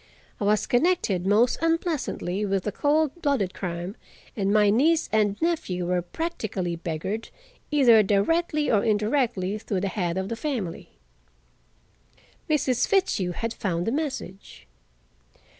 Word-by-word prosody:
I 205 - -1
was 210 +1 +2
connected 245 - +1
most 220 +5 +3
unpleasantly 325 - -1
with 195 -2 -1
a 210 - -1
cold 310 +5 +1
blooded 260 - 0
crime, 175 +1 -5 0.4
and 200 -2 0
my 210 -1 +4
niece 310 +9 +3
and 210 -2 +1
nephew 305 - -1
were 180 0 0
practically 190 - -3
beggared, 175 +7 -4 0.4
either 250 -7 +6
directly 300 - +1
or 210 -3 +3
indirectly, 215 -2 0
through 200 -3 -3
the 200 - -1
head 180 -3 -2
of 190 0 -2
the 230 - -2
family. 230 - -4 1.6
Mrs. 275 -5 +1
Fitzhugh 285 - +1
had 230 +6 -3
found 175 -3 -2
the 225 - 0
message. 265 - -5
215 Hz, 130 wpm, -25 LUFS, 190-290 Hz, 1.6 s, either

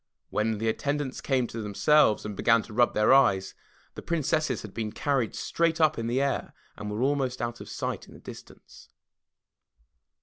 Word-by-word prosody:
When 110 0 0
the 115 +2 -2
attendants 145 +3 -2
came 130 -3 +1
to 115 -1 -6
themselves 110 +3 +3
and 105 -1 -5
began 115 +2 +3
to 110 - -12
rub 120 +2 +2
their 105 +4 +4
eyes, 100 -8 +3 0.4
the - - -8
Princesses 155 -5 -1
had 105 -3 -9
been 110 -2 -3
carried 135 -4 -1
straight 165 -1 0
up 155 -6 +3
in 115 - -3
the 120 +3 0
air 140 0 -2 0.2
and 105 0 -6
were 105 +4 -2
almost 135 -2 0
out 120 0 -4
of - - -10
sight - - -4
in - - -15
the - - -13
distance! - - -13
120 Hz, 180 wpm, -27 LUFS, 110-140 Hz, 0.4 s, their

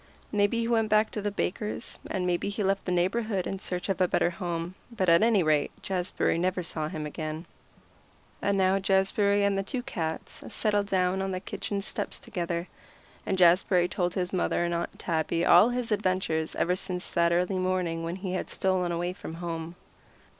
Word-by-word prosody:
Maybe 210 +2 +2
he 230 - -1
went 225 -2 +2
back 215 +1 +3
to 210 - -3
the 205 - 0
baker's, 210 +3 -3
and 185 -2 -1
maybe 180 +2 0
he 205 +1 -2
left 195 0 0
the 180 - -1
neighborhood 190 +2 0
in 195 - -3
search 180 -1 -3
of 195 -1 -1
a 180 - +5
better 175 - +2
home, 170 0 -4 0.2
but 195 -7 0
at 170 0 +6
any 220 -4 +4
rate 155 -2 +2
Jazbury 180 -3 0
never 180 +1 0
saw 155 -2 -2
him 155 -1 -5
again. 155 +2 -5 1.0
And 200 0 +1
now 190 0 +3
Jazbury 200 +1 +2
and 200 0 +2
the 195 - +1
two 245 +6 -4
cats 160 -9 -4
settled 205 -2 +1
down 185 0 +1
on 195 - -1
the 185 -1 -2
kitchen 200 +1 -4
steps 195 - -3
together, 170 0 -3 0.6
and 190 - 0
Jazbury 180 0 +5
told 180 -1 -1
his 180 0 -2
mother 175 -1 +1
and 170 - -1
Aunt 170 0 -3
Tabby 165 0 0
all 225 - +7
his 245 -2 -2
adventures 185 -6 0
ever 180 +1 +1
since 185 -1 -4
that 170 -1 +3
early 180 +2 +1
morning 180 -3 0
when 165 +1 -3
he 190 -1 -4
had 185 - -3
stolen 185 -2 0
away 175 +1 -1
from 165 - -8
home. 165 -1 -5
185 Hz, 190 wpm, -28 LUFS, 170-200 Hz, 1.0 s, all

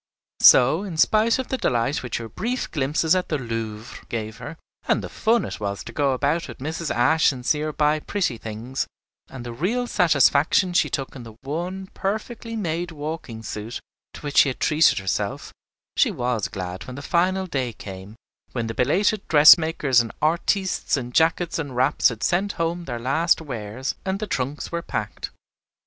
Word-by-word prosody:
So, 135 +8 +7
in 190 -6 -6
spite 215 +7 +4
of 260 - -4
the 260 - -2
delight 120 +4 0
which 125 - -3
her 115 - -6
brief 245 - -3
glimpses 150 +3 +1
at 185 -1 0
the 155 - 0
Louvre 115 -2 -6
gave 110 -2 -4
her, 150 +3 -8 0.3
and - - +1
the - - -6
fun 230 +1 +1
it - - -6
was 100 -1 -3
to - - -9
go 140 -2 +1
about 145 +6 0
with - - -9
Mrs. 160 +3 -4
Ashe 155 +7 +3
and 125 -2 -8
see 150 - +2
her 155 0 -2
buy 150 +1 +2
pretty 150 - -2
things, 115 +4 -4 0.4
and 130 -2 -9
the 120 - -6
real 215 - -1
satisfaction 160 - +3
she 175 - +3
took 135 -1 -4
in 130 - -8
the 115 -2 -11
one 175 +7 -4
perfectly 220 +3 -4
made 175 -4 -2
walking 150 -7 -6
suit 110 +2 -5 0.4
to - - -10
which 145 -1 -4
she 140 - +7
had 130 - -6
treated 155 +1 +4
herself, 95 -1 -3 0.4
she - - +4
was 120 -4 -1
glad 90 -1 -6
when 130 - -7
the 140 - -8
final 185 +4 +1
day 135 -8 -2
came, 100 -1 -10 0.4
when 120 -3 -2
the 115 - -4
belated 190 - +1
dressmakers 155 -4 +6
and 115 - -5
artistes 170 +3 +1
in 125 -2 -5
jackets 165 +4 +2
and 140 -5 -5
wraps 130 +4 +3
had 115 -3 -7
sent 195 +4 +1
home 170 +1 -2
their 120 -5 -4
last 140 +8 +2
wares, 125 -3 -5
and 190 0 -1
the 215 - -2
trunks 140 -5 -3
were 170 0 -2
packed. 105 -10 -4
145 Hz, 185 wpm, -23 LUFS, 120-170 Hz, 0.4 s, So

